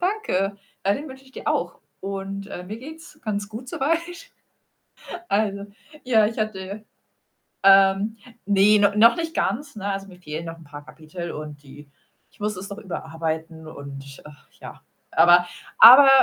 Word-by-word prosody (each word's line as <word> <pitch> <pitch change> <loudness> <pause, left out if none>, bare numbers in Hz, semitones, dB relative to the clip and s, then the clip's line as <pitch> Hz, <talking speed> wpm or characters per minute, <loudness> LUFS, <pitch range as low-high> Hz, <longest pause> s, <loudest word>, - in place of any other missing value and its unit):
Danke, 350 - -1 0.3
ja, 200 +1 +3
den 295 +5 -6
wünsche 265 0 -12
ich 265 - -21
dir - - -10
auch. - - -1 0.2
Und, 195 0 -5
äh, 180 - -7
mir 205 +4 -7
geht's 315 +6 -12
ganz 205 -2 -3
gut 225 +4 -9
soweit, 315 +6 0 1.3
also 200 -1 0 0.4
ja, 225 -4 +4
ich 225 +2 -5
hatte 210 -1 -4 0.8
ähm, 195 +2 +5 0.3
ne, 205 +1 +5
no 200 -1 +4
noch 230 +6 +6
nicht 330 -1 -4
ganz, 280 +3 -2
ne, 200 -1 -3
also, 195 0 -5
mir 180 -2 -14
fehlen 155 -1 -6
noch 165 0 -7
'n 165 - -15
paar 145 0 -11
Kapitel 155 +3 -8
und 150 -1 -8
die 145 +1 -14 0.4
ich - - -28
muss 210 0 -2
es 190 +2 -7
noch 200 - -7
überarbeiten 160 -4 -5
und, 140 -3 -10
äh, 150 - -11 0.3
ja. - - -11 0.3
Aber 175 +1 +5 0.3
aber, 260 +5 +10
195 Hz, 165 wpm, -23 LUFS, 165-220 Hz, 1.3 s, aber